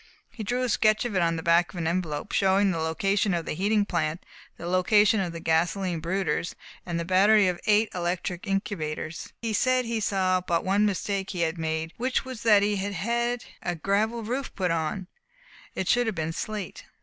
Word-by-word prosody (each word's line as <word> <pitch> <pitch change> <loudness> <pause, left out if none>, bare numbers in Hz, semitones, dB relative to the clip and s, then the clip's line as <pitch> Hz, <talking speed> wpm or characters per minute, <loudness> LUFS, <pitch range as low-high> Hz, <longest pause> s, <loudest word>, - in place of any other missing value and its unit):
He 225 - -7
drew 245 +4 -1
a - - +1
sketch 215 0 +3
of 230 -5 -3
it 185 - +3
on 165 -1 +2
the 160 - -5
back 170 +1 +3
of 185 - -10
an 170 - -2
envelope, 165 0 -2
showing 195 0 +3
the 165 - -2
location 195 +5 +1
of 170 -1 -3
the - - -3
heating 205 +5 +1
plant, 165 -2 -2 0.3
the 170 - -8
location 205 +4 +4
of 180 -3 -1
the 165 - -7
gasoline 170 +2 0
brooders, 170 0 -1 0.3
and 170 -1 -2
the 170 - -3
battery 195 +3 +5
of 180 -1 -1
eight 215 +1 +4
electric 175 +2 -3
incubators. 170 -5 -3
He 225 -1 -1
said 255 +3 +2
he 230 -1 -1
saw 185 -3 +1
but 170 -2 -1
one 200 +3 +3
mistake 195 0 -2
he 180 -3 -3
had 165 0 -1
made, 160 0 -2
which 255 +2 0
was 255 -3 -7
that 210 -3 +5
he 205 0 +1
had 200 +1 -3
had 235 +6 -1 0.2
a 175 - -2
gravel 215 +7 0
roof 255 +5 -4
put 180 -3 0
on. 165 +3 -2 0.7
It 190 - -2
should 245 -1 +3
have 220 - -1
been 160 -1 -2
slate. 210 0 -5
190 Hz, 205 wpm, -26 LUFS, 170-215 Hz, 0.7 s, battery